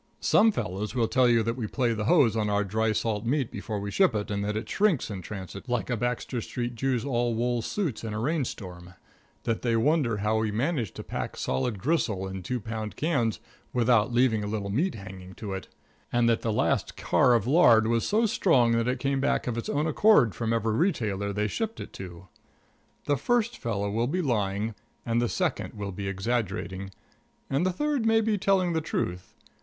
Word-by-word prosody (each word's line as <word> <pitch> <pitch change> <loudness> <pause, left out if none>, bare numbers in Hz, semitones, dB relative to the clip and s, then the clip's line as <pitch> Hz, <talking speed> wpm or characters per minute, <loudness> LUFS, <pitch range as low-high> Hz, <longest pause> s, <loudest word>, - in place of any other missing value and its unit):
Some 220 +1 +4
fellows 105 - -4
will 115 -3 +2
tell 130 0 +3
you 115 -1 +4
that 115 +1 -1
we 120 -4 -3
play 120 0 0
the 105 -1 -3
hose 135 -5 +4
on 105 -2 0
our 100 0 +2
dry 110 +3 0
salt 110 -1 -1
meat 130 +1 0
before 105 -3 -4
we 100 0 -4
ship 190 - +3
it, 105 0 -2
and 100 0 -1
that 105 +1 -1
it 110 - -4
shrinks 190 - +1
in 95 -2 -5
transit 100 +4 -8
like 120 -3 -1
a - - +2
Baxter 120 +1 -2
Street 120 +1 -4
Jew's 125 0 -1
all 120 -3 0
wool 120 +1 0
suits 150 - -3
in 110 - -4
a 105 - -3
rainstorm; 100 - -3 0.5
that 115 - -1
they 120 -2 +1
wonder 125 -2 +2
how 105 +2 +1
we 110 -1 0
manage 120 - -1
to - - -7
pack - - -5
solid 65 - -1
gristle 105 - 0
in 95 0 -6
two 125 +8 -3
pound 110 0 -5
cans 130 -10 0 0.3
without 120 -2 +3
leaving 120 -3 +2
a - - -3
little 105 -2 -3
meat 165 - 0
hanging 95 -2 -10
to 100 -3 -5
it; 95 -1 -6 0.4
and 120 -1 +3
that 115 -1 +2
the 115 - -1
last 105 - 0
car 125 -2 +3
of 110 -3 +1
lard 120 -6 +6
was 115 0 +1
so 220 +3 +2
strong 160 - +3
that 115 0 +1
it 125 +1 0
came 135 +2 0
back 140 - +1
of 120 - -2
its 115 - -4
own 145 +2 0
accord 155 - +4
from 115 -1 -2
every 115 -1 +1
retailer 110 - 0
they 105 +1 -1
shipped 225 - -3
it - - -8
to. 90 -1 -9 0.8
The 145 - +1
first 235 - +1
fellow 100 -3 -2
will 115 +3 0
be 180 +6 -1
lying, 105 -4 0 0.3
and 115 0 +1
the 120 - 0
second - - -2
will 100 -1 -4
be 100 +1 -5
exaggerating, 95 -2 -2 0.6
and 135 +5 +2
the - - +1
third 285 +2 0
may 225 0 +4
be 215 -2 0
telling 185 -2 +2
the 160 - 0
truth. 90 - -3
115 Hz, 210 wpm, -27 LUFS, 105-135 Hz, 0.8 s, lard